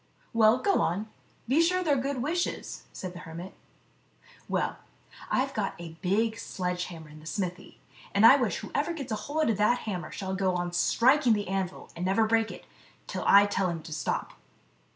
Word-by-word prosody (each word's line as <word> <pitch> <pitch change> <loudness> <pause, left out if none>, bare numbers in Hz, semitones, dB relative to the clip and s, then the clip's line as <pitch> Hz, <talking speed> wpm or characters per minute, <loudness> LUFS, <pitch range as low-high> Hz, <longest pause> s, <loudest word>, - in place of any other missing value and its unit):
"Well, 225 +1 +5
go 395 +9 +2
on; 200 +6 -1 0.4
be 275 +7 +4
sure 365 +2 +2
they're 300 -4 +3
good 265 -1 -1
wishes," 345 +5 -2
said 185 -1 -6
the 175 - -9
hermit. 170 +2 -8 1.0
"Well, - - -1 0.5
I've 270 +1 +1
got 205 -3 -2
a 165 -1 -9
big 220 +4 +1
sledge 180 -1 -3
hammer 165 -3 -9
in 150 +1 -12
the 155 - -12
smithy, 185 -1 -4 0.3
and 200 +2 +4
I 245 - +10
wish 235 -9 0
whoever 305 +4 -2
gets 275 -7 -6
hold 290 +5 0
of 210 - -1
that 225 +4 +3
hammer 185 -5 -4
shall 190 -1 -4
go 190 -1 +1
on 175 0 -2
striking 250 +7 +4
the 205 -1 -1
anvil, 190 -1 -3
and 170 - -5
never 195 +4 +3
break 225 0 +2
it, - - -10 0.4
till - - -4
I 200 +1 +8
tell 195 -2 0
him 165 -2 -4
to 160 -1 -7
stop." 150 -4 -2
205 Hz, 185 wpm, -28 LUFS, 180-250 Hz, 1.0 s, I